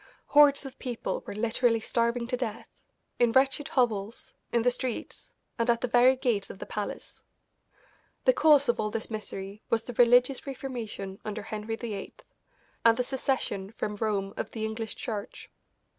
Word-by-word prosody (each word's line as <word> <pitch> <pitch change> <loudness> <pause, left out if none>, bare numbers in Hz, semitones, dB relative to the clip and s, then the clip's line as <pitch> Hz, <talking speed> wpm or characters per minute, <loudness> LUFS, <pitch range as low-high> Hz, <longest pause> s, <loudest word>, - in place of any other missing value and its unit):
Hordes 290 -1 +6
of 270 - -9
people 245 -3 -3
were - - -5
literally 230 +1 +2
starving 235 +1 0
to 250 +1 -1
death, 235 -3 -6 0.4
in 240 -1 +4
wretched 270 +2 +3
hovels, 225 -4 0 0.2
in 235 -1 +2
the 245 - +4
streets, 250 -1 -5 0.3
and 230 +1 +1
at 235 -1 +3
the - - 0
very 245 +2 +5
gates 240 -7 0
of - - -8
the - - -7
palace. 210 -1 -6 1.0
The - - +6
cause 295 - +5
of 240 - +1
all 210 - 0
this 225 +1 -4
misery 205 -1 -6
was 225 0 +1
the 245 - -7
religious 245 +3 +4
reformation 230 -8 -5
under 215 0 -4
Henry 215 +1 -4
VIII, 220 -4 -6 0.7
and 230 0 +6
the 250 - +1
secession 250 -6 -2
from 210 -2 -3
Rome 200 -2 -1
of - - -3
the 220 -1 -4
English 220 0 -4
Church. 215 0 -6
230 Hz, 165 wpm, -28 LUFS, 215-250 Hz, 1.0 s, Hordes